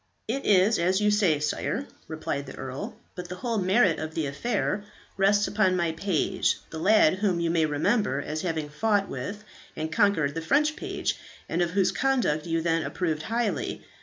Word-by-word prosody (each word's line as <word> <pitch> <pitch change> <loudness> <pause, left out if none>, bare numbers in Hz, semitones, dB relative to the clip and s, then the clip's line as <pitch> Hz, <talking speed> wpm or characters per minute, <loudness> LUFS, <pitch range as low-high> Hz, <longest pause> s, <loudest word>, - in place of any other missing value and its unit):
"It 270 +5 -2
is 200 +2 +4
as 185 +3 +2
you 210 0 +3
say, 190 -8 +3
sire," 150 - -2 0.2
replied 155 -3 -4
the 135 - -8
earl; 130 +1 -6 0.2
"but 180 -1 -7
the 180 - -5
whole 230 +3 -2
merit 190 -1 +3
of 155 0 -5
the 160 - 0
affair 200 - -1 0.3
rests 205 +1 +3
upon 205 -3 +2
my 170 -2 +1
page, 165 0 0
the 160 - -5
lad 190 -1 +4
whom 195 -5 +1
you 170 -1 0
may 165 -2 +2
remember 150 - +1
as 150 +2 -4
having 160 -4 -2
fought 200 +6 +1
with 205 +1 -6 0.3
and 155 +1 -4
conquered 165 -8 +2
the 165 - -3
French 300 - +2
page, - - -3 0.3
and 170 - -1
of 175 - +2
whose 190 +1 +2
conduct 210 - 0
you 165 0 0
then 165 -1 +1
approved 160 -2 -2
highly. 225 +5 -2
180 Hz, 185 wpm, -27 LUFS, 160-210 Hz, 0.3 s, is